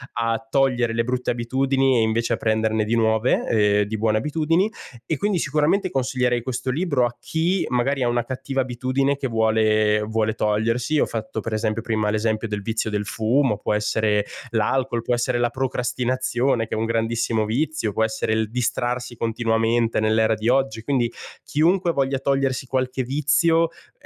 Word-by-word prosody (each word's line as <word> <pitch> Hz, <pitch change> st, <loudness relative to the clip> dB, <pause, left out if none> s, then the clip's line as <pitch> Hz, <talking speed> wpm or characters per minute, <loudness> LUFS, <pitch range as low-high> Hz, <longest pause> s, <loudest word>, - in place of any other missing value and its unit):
a 115 Hz, +3 st, -1 dB
togliere 125 Hz, -4 st, +2 dB
le 115 Hz, -, +1 dB
brutte 125 Hz, +1 st, -1 dB
abitudini 130 Hz, +2 st, +1 dB
e -, -, +3 dB
invece 110 Hz, +1 st, 0 dB
a -, -, 0 dB
prenderne 110 Hz, 0 st, +1 dB
di 115 Hz, +2 st, 0 dB
nuove, 110 Hz, +1 st, +2 dB
ehm, 105 Hz, -2 st, +3 dB
di 110 Hz, +2 st, -4 dB
buone 110 Hz, 0 st, +1 dB
abitudini. 165 Hz, -, +1 dB, 0.3 s
E 160 Hz, -, -1 dB
quindi 205 Hz, -2 st, 0 dB
sicuramente 155 Hz, +6 st, +1 dB
consiglierei 125 Hz, -3 st, 0 dB
questo 130 Hz, +1 st, -3 dB
libro 170 Hz, +4 st, -2 dB
a 120 Hz, -, -4 dB
chi 170 Hz, +4 st, 0 dB
magari 130 Hz, +2 st, 0 dB
ha 120 Hz, -, +1 dB
una 120 Hz, 0 st, +1 dB
cattiva 135 Hz, +2 st, -3 dB
abitudine 130 Hz, +3 st, -1 dB
che 135 Hz, -, -2 dB
vuole 110 Hz, -2 st, +2 dB
vuole 110 Hz, 0 st, 0 dB
togliersi. 115 Hz, +7 st, 0 dB
Ho -, -, +3 dB
fatto 110 Hz, -1 st, -4 dB
per 115 Hz, -, -5 dB
esempio 110 Hz, 0 st, -1 dB
prima 110 Hz, -2 st, -1 dB
l'esempio 110 Hz, +1 st, -1 dB
del 105 Hz, -1 st, -4 dB
vizio 110 Hz, +1 st, -2 dB
del 105 Hz, 0 st, -2 dB
fumo, 115 Hz, +1 st, +1 dB
può 105 Hz, -, -2 dB
essere 105 Hz, 0 st, +1 dB, 0.3 s
l'alcol, 120 Hz, +2 st, 0 dB
può 120 Hz, -, -1 dB
essere 120 Hz, +1 st, 0 dB
la 120 Hz, 0 st, +2 dB
procrastinazione 125 Hz, -1 st, -1 dB
che -, -, -6 dB
è -, -, -3 dB
un 110 Hz, -, 0 dB
grandissimo 115 Hz, -1 st, 0 dB
vizio, 125 Hz, -2 st, -1 dB
può 110 Hz, -, +1 dB
essere 110 Hz, 0 st, -1 dB
il 110 Hz, -1 st, 0 dB
distrarsi 125 Hz, 0 st, -2 dB
continuamente 115 Hz, 0 st, 0 dB
nell'era 110 Hz, +1 st, +2 dB
di 110 Hz, +2 st, -1 dB
oggi. 130 Hz, -4 st, +1 dB
Quindi 120 Hz, -3 st, 0 dB, 0.3 s
chiunque 170 Hz, +3 st, +2 dB
voglia 135 Hz, -2 st, 0 dB
togliersi 135 Hz, -1 st, 0 dB
qualche 130 Hz, 0 st, -1 dB
vizio 155 Hz, +5 st, +2 dB
è -, -, -23 dB
120 Hz, 170 wpm, -22 LUFS, 110-135 Hz, 0.3 s, e